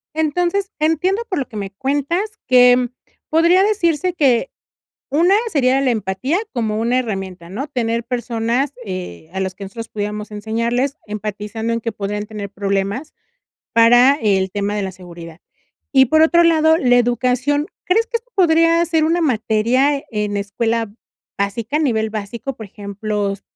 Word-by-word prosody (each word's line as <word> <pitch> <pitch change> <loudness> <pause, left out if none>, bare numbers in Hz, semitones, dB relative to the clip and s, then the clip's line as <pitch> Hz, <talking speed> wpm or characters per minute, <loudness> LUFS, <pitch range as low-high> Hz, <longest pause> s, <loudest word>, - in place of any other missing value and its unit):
Entonces, 355 +6 0
entiendo 340 +7 +1
por 370 - -1
lo 265 - -3
que 220 - -9
me 200 -1 -4
cuentas 290 - -1 0.2
que 250 -1 +5 0.4
podría 335 +4 +4
decirse 365 -4 +1
que, 270 -7 +2 0.6
una 340 +7 +4 0.2
sería 270 -4 +2
la 270 -2 +2
empatía 220 - -1 0.2
como 220 -4 -1
una 235 +3 +1
herramienta, 190 -7 -4
¿no?, 230 +10 -4
tener 235 -4 -2
personas, 245 +2 -1
eh, 180 - -7
a 190 - -3
las 190 -1 -2
que 200 - -8
nosotros 225 +4 -8
pudiéramos 210 0 -4
enseñarles, 230 +7 -1
empatizando 210 +2 -4
en 230 - -1
que 230 0 -3
podrían 205 +1 -4
tener 205 -2 -7
problemas 200 +7 -2 0.6
para 245 +4 +6
el 190 -3 +1
tema 205 0 -2
de 205 - -1
la 190 - -4
seguridad. 170 -2 -11 0.5
Y 265 -2 +6
por 315 +5 +4
otro 340 +1 +5
lado, 320 -1 +4
la 250 -6 +3
educación, 250 +4 +1 0.2
¿crees 445 +5 +2
que 465 0 -2
esto 485 +2 -33
podría 330 -1 +4
ser 325 -1 +1
una 335 +2 +1
materia 255 +2 +1
en 210 -1 -1
escuela 225 +2 -1 0.4
básica 220 +8 -1
a - - 0
nivel 220 -7 0
básico?, 220 +5 -5
por 220 - -8
ejemplos, 200 0 -4
235 Hz, 155 wpm, -19 LUFS, 210-300 Hz, 0.6 s, para